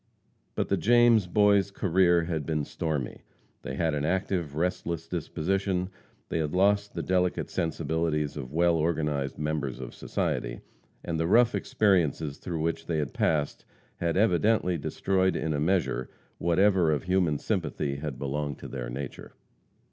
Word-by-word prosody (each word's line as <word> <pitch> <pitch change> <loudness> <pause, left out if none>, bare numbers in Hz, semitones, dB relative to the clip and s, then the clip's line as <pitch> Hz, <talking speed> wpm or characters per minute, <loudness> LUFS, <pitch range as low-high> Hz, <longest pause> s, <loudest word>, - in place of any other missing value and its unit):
But - - -1
the - - +2
James 120 -4 +5
boys' 100 +1 +4
career 90 -3 +3
had 80 -2 -2
been 75 0 -1
stormy; 75 -6 -3 0.4
they - - -5
had 80 -1 0
an 70 -1 -1
active, 90 -3 -1
restless 85 -1 -2
disposition; 90 +3 -1 0.4
they - - -1
had 75 +1 -2
lost 100 +2 +2
the - - -2
delicate 90 -1 0
sensibilities 80 -2 -1
of 65 -4 -6
well 85 +2 +3
organized 75 -4 -1
members 75 -4 -2
of 65 -2 -7
society, - - -2 0.4
and 80 -2 -2
the 80 - +1
rough 120 +5 +5
experiences 80 -8 +1
through 85 -3 -4
which 80 0 -2
they 85 - 0
had 75 -3 -2
passed 75 -3 0 0.3
had 85 0 -1
evidently 100 -1 +3
destroyed, 95 +4 0
in 80 0 -1
a 75 - -1
measure, 85 -5 0 0.3
whatever 90 -1 +3
of 75 - 0
human 90 -4 +1
sympathy 70 0 -2
had 70 -3 -5
belonged 70 +1 -3
to - - -9
their - - -5
nature. 70 +2 -7
80 Hz, 150 wpm, -28 LUFS, 75-95 Hz, 0.4 s, James